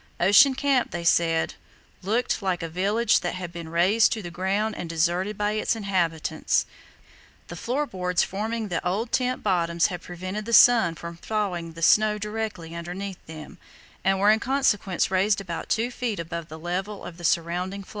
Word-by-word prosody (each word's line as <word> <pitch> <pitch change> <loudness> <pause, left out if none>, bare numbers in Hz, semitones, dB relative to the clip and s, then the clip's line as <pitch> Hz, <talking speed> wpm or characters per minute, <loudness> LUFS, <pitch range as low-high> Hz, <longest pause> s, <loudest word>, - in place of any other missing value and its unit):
Ocean 235 +10 +6
Camp, 270 -2 +1
they 175 0 -5
said, 165 -1 +2 0.5
"looked 220 +5 0
like 185 -3 -1
a - - -2
village 200 +7 +2
that - - -3
had 180 -2 -6
been 170 -2 -7
razed 185 +7 +3
to 220 -3 -5
the 175 - -7
ground 195 +5 -1
and 170 - -6
deserted 175 +5 0
by 210 0 0
its 215 +2 0
inhabitants." 185 -7 0 0.8
The - - -7
floor 265 +5 -1
boards 180 -6 0
forming 220 +2 -3
the 170 - -2
old 205 +7 -2
tent 255 0 0
bottoms 170 -4 +1
had 175 - -6
prevented 185 +5 -6
the 230 - -4
sun 225 -8 +6
from 170 +1 -8
thawing 180 -5 -3
the 165 +1 -7
snow 215 +4 +4
directly 210 -6 -5
underneath 180 +3 -6
them, 155 -1 -10 0.4
and 195 0 +2
were 205 +2 +5
in 220 - +3
consequence 220 -9 +1
raised 200 +2 +2
about 175 -4 -6
two 235 +2 0
feet 240 -5 -3
above 170 -1 -5
the 160 - -8
level 185 +5 -4
of 170 -1 -9
the 175 - -11
surrounding 175 +4 -1
floe. - - -19
190 Hz, 180 wpm, -25 LUFS, 170-215 Hz, 0.8 s, Ocean